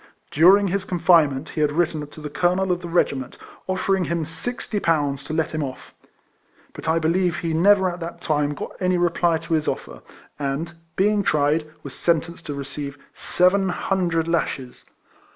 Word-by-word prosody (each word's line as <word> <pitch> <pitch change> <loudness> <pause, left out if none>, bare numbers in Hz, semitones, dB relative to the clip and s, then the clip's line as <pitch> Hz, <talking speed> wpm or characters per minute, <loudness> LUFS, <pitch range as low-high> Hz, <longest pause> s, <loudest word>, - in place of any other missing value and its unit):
During 190 +6 +6
his 195 +1 -1
confinement 160 -6 +3
he 155 - -3
had 150 -1 +2
written 155 -2 0
to 155 - -13
the 150 - -5
colonel 180 +4 +1
of 180 0 -1
the 175 - -6
regim.ent, 140 -6 0 0.3
oifering 185 -1 +1
him 170 -2 -1
sixty 210 +6 -4
pounds 145 -6 0
to - - -7
let 160 -1 0
him 155 - -2
off; 130 -2 -8 0.8
but - - -9
I 160 - +3
believe 170 +1 +1
he 165 -1 -2
never 190 +3 +4
at 175 0 -4
that 170 0 -6
time 145 -3 0
got - - -6
any 185 -1 +1
reply 175 -1 +2
to 165 +1 -5
his 155 -1 +1
offer, 60 -1 -4 0.4
and, 145 +4 -3 0.2
being 205 +2 +2
tried, 155 -2 +1
was 140 - -8
sentenced 170 0 -1
to 145 - -4
receive 140 0 -6 0.2
seven 190 +2 +2
hundred 175 -3 0
lashes. 140 -6 -2
165 Hz, 170 wpm, -23 LUFS, 150-180 Hz, 0.8 s, During